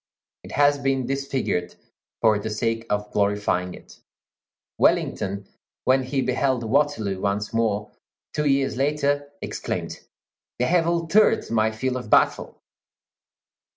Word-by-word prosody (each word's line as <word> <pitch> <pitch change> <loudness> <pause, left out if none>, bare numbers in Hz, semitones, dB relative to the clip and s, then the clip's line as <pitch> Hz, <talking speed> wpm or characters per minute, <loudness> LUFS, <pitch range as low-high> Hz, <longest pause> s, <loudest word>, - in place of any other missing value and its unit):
It - - -10
has 145 0 +4
been 135 -2 0
disfigured 135 -9 -2 0.5
for 110 -2 +4
the 110 - -4
sake 115 +1 -2
of 105 0 -2
glorifying 100 -3 0
it. - - -16 0.8
Wellington, 100 0 +1 0.4
when 130 +1 +3
he 130 +1 -1
beheld 130 -1 0
Waterloo 115 -6 0
once 100 +2 -1
more, 105 -2 0 0.4
two 150 0 0
years 135 -2 +1
later, 145 0 0
exclaimed, - - -4 0.6
"They 125 - +1
have 170 +2 +2
altered 170 - +2
my 110 -1 +3
field 125 +4 -2
of 125 -4 -7
battle!" - - +2
125 Hz, 120 wpm, -24 LUFS, 105-140 Hz, 0.8 s, has